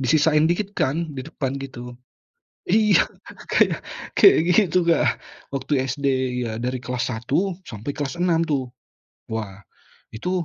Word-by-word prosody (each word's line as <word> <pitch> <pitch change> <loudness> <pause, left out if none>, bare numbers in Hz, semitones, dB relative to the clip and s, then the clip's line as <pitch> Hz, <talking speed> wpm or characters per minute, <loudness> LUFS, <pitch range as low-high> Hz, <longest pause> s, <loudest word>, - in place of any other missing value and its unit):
disisain 155 +4 +3
dikit 195 +3 -1
kan 155 -1 -1
di 130 - -5
depan 135 -1 -4
gitu. 125 -2 -8 0.8
Iya, 215 - +5 0.5
kayak - - +3 0.4
kayak 395 - +7 0.2
gitu, 180 -4 +3
Kak. 170 - +3 0.3
Waktu 135 -1 0
SD 135 +2 -3 0.4
iya, 115 - -3
dari 125 0 -2
kelas 125 0 -3
1 160 - -1
sampai 115 +5 -5
kelas 145 +2 -3
6 170 -2 +2
tuh. 130 -5 -1 0.6
Wah, 105 -3 -5 0.5
itu 180 +10 -2
145 Hz, 130 wpm, -23 LUFS, 125-170 Hz, 0.8 s, kayak